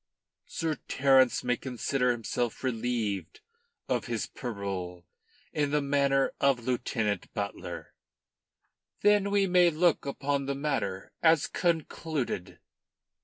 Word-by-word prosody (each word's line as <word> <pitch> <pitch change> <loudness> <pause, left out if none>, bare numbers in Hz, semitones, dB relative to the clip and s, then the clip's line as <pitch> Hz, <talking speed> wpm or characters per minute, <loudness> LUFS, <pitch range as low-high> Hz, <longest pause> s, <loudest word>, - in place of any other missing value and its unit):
Sir 160 -3 -2
Terence 130 -2 +4
may 125 0 +1
consider 125 0 -1
himself 120 0 -2
relieved 115 -7 -2 0.5
of - - 0
his - - -2
parole 95 -7 -5 0.5
in 145 -2 +1
the 150 +1 +2
matter 140 -1 +2
of 135 -4 +2
Lieutenant 115 -6 -1
Butler." 100 -1 -5 1.1
"Then 205 -1 +4
we 200 -1 +3
may 180 -1 +5
look 165 -1 +2
upon 140 0 -1
the 140 - -1
matter 135 -10 -2
as 160 -2 +5
concluded." 160 - -2
135 Hz, 110 wpm, -29 LUFS, 115-150 Hz, 1.1 s, may